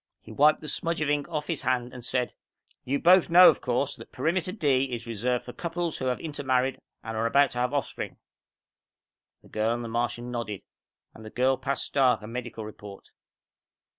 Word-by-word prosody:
He - - -14
wiped 150 +2 +4
the 155 - -8
smudge 170 +2 -1
of 150 -1 +1
ink 145 +2 -1
off 150 -3 -3
his 165 -3 -2
hand 125 -1 -1
and 125 - -9
said, 125 0 -1 0.5
"You 140 +3 0
both 180 +4 +5
know, 180 +2 +9
of - - 0
course, 130 +3 -1
that - - -12
Perimeter 180 +2 -1
D 140 - +2
is 120 -3 -5
reserved 120 +2 -2
for 125 - -8
couples 170 -1 -3
who 130 - -3
have 125 -1 0
intermarried 135 -4 -1 0.2
and 110 0 -5
are 110 +1 0
about 140 +4 +4
to 125 - -4
have 125 +1 +1
offspring?" 145 -2 -3 1.3
The - - -18
girl 110 +2 0
and 120 - -5
the - - -5
Martian 120 +1 -2
nodded, 115 -5 -4 0.5
and 110 - -13
the 110 - -8
girl 130 +4 +2
passed 140 +2 -2
Stark 125 -6 +2
a - - -7
medical 115 -2 -6
report. 105 -2 -11
130 Hz, 195 wpm, -27 LUFS, 120-145 Hz, 1.3 s, know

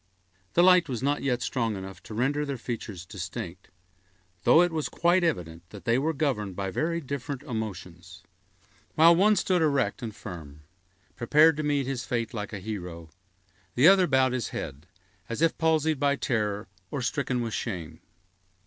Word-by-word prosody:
The 175 - +6
light 180 -3 +6
was 125 -1 -3
not 145 +1 +1 0.2
strong 115 -4 -1
enough 95 -1 -8
to 110 - -9
render 140 +6 +1
their 140 -2 -3
features 110 -7 -6
distinct, 95 0 -7 0.8
though 170 - +7
it 175 - +1
was 155 -2 -2
quite 175 +1 +2
evident 85 - -1
that 105 0 -12
they 120 +1 +3
were 155 +4 +1
governed 130 - -1
by 95 0 -3
very 165 - -1
different 140 -1 -5
emotions. 90 -5 -7 0.7
While 165 +2 +7
one 210 +4 +4
stood 185 -3 +1
erect 140 -4 +1
and 110 -3 -6
firm, 80 -7 -9 0.5
prepared 150 +6 +5
to - - -1
meet 145 -2 0
his 130 -1 -3
fate 120 -2 -2
like 105 -3 -5
a 105 - -5
hero, 90 -5 -7 0.6
the 130 +6 +6
other 190 -1 +6
bowed 130 -3 +3
his 125 -3 -2
head, 75 +6 -6 0.4
as 115 - -4
if 165 - +3
palsied 160 -2 +2
by 140 0 +2
terror 105 -8 -1 0.2
or 140 -3 -3
stricken 125 0 -1
with 115 -2 -3
shame. 85 -8 -4
125 Hz, 165 wpm, -27 LUFS, 100-150 Hz, 0.8 s, though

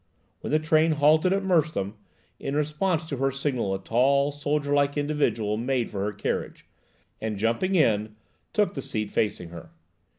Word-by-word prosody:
When - - -6
the 155 - +3
train 155 +1 +3
halted 155 +4 +4
at 195 +1 +1
Merstham, 155 - +1 0.5
in 140 - -3
response 155 +3 0
to 145 -4 -4
her 135 +1 +1
signal 130 -7 -1
a 95 - -7
tall, 140 +4 +2
soldier 145 0 -1
like 145 0 +2
individual 145 -8 0
made 125 0 -1
for 100 -2 -3
her 105 - -1
carriage, - - -4 0.6
and, 110 -2 -3
jumping 115 - 0
in, 110 - +2 0.4
took 210 -2 +1
the 135 - -4
seat 110 -4 -2
facing 100 -5 -1
her. 85 -1 -10
140 Hz, 165 wpm, -26 LUFS, 110-155 Hz, 0.6 s, halted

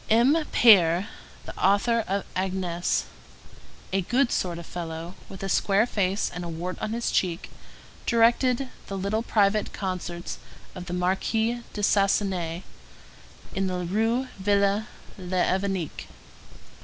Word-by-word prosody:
M. 235 +6 +5 0.2
Paër, 185 -5 +6 0.4
the - - -8
author 220 +4 +3
of 200 +1 -1
Agnese, 185 -2 -1 0.9
a 195 - +2
good 245 +7 +1
sort 175 -2 -1
of 170 - -8
fellow, 165 0 -6 0.2
with 190 - -9
a - - -2
square 195 +3 +3
face 200 -4 0
and 180 - -5
a 170 - -5
wart 175 +3 -4
on 215 - -3
his 235 0 -1
cheek, 175 -2 -1 0.6
directed 240 +3 +3 0.2
the 195 - -4
little 200 +3 -1
private 210 -2 +1
concerts 180 -3 -4 0.3
of 180 -1 -8
the 175 - -4
Marquise 220 +6 0
de 205 - -4
Sasenaye 195 -4 +1 0.9
in 195 0 0
the 180 -1 -2
Rue 225 +7 0
Ville 200 +2 +2 0.3
l'Évêque. 185 -1 -1
195 Hz, 130 wpm, -26 LUFS, 180-220 Hz, 0.9 s, Paër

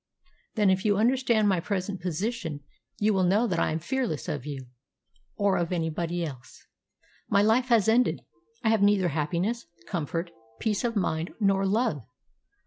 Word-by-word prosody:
"Then 210 -4 +4
if 190 +1 +1
you 205 -3 +2
understand 235 -1 +3
my 190 -3 +2
present 190 +1 -3
position 180 -3 -3 0.4
you 210 +1 +2
will 190 - +2
know 200 +6 +3
that 175 -7 0
I - - +2
am 155 - 0
fearless 225 - -2
of 145 -1 -4
you, 135 -3 -6 0.7
or 200 -2 +2
of 170 0 -1
anybody 170 0 -1
else. 130 -6 -10 0.6
My 200 0 +4
life 230 +4 +3
has 230 -5 +4
ended. 240 +3 +3 0.4
I 220 - +3
have 220 -2 +3
neither 200 -3 +4
happiness, 170 +10 -1 0.2
comfort, 170 0 -3 0.3
peace 215 0 0
of 235 -1 -1
mind, 170 -4 -1
nor 195 -2 +2
love. 210 - +1
195 Hz, 160 wpm, -27 LUFS, 170-220 Hz, 0.7 s, Then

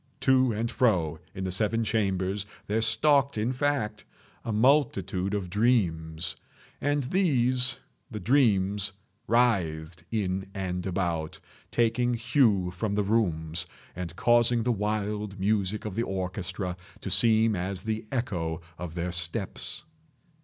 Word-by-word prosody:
To 130 -2 +4
and 115 +2 -2
fro 85 -11 +1 0.2
in 95 - -4
the 95 - -2
seven 110 +4 +1
chambers 100 -2 -1 0.2
there 110 +2 0
stalked, 140 +3 +3
in 115 +4 0
fact, 130 -6 -1 0.4
a 115 - -3
multitude 105 - +2
of 100 -3 -2
dreams. 85 -7 0 0.5
And 145 0 +1
these—the 130 - +1
dreams—writhed 100 - +1
in 95 -3 -2
and 90 -1 -3
about, 85 -4 -2 0.3
taking 120 +1 +1
hue 115 -6 +2
from 100 +3 -2
the 105 - +1
rooms, 85 -7 0 0.3
and 85 -2 -5
causing 120 +1 +3
the 125 - +1
wild 105 -1 -2
music 100 +1 0
of 105 - -4
the 115 - -1
orchestra 95 -2 -3 0.2
to 100 - -5
seem 110 +1 +4
as 95 +1 -3
the 110 0 -3
echo 85 -11 -2 0.2
of 85 -2 -6
their 90 +1 -2
steps. 85 -1 -1
105 Hz, 125 wpm, -27 LUFS, 90-115 Hz, 0.5 s, To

